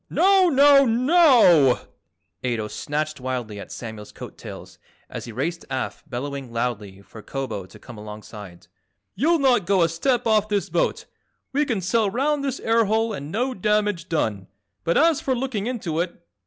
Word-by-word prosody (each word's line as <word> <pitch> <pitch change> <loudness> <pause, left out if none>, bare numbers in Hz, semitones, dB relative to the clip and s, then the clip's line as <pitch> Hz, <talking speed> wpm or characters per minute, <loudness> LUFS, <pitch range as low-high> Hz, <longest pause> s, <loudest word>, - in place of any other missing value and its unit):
"Now, 380 -1 +4
now, 280 -1 +6
NOW!" 240 - +5 0.6
Ato 115 -4 -1
snatched 150 +3 -3
wildly 125 -5 -4
at - - -10
Samuel's 110 -3 -8
coat - - -10
tails - - -11 0.3
as - - -6
he 115 - -8
raced 165 +9 -3
aft 130 +3 -5
bellowing 135 0 -5
loudly 105 -5 -4
for 110 - -13
Kobo 115 -7 -5
to 90 - -15
come 120 -4 -12
alongside. 105 -4 -10 0.5
"You'll 330 +5 +2
not 250 - +2
go 190 -3 +3
a - - +4
step 245 +9 0
off 215 -2 +2
this 200 -4 -1
boat. 170 - 0 0.5
We 295 +2 +2
can 225 -8 -1
sail 210 +3 +1
round 280 +6 0
this 275 -3 -2
air 225 0 +2
hole 220 +2 0
and 145 -5 -6
no 250 +7 -1
damage 210 -4 0
done, 105 - -1 0.4
but 170 - +1
as 325 -1 +3
for 260 - 0
looking 240 -4 -3
into 195 -11 -3
it! 175 +1 -3
180 Hz, 170 wpm, -23 LUFS, -, 0.6 s, now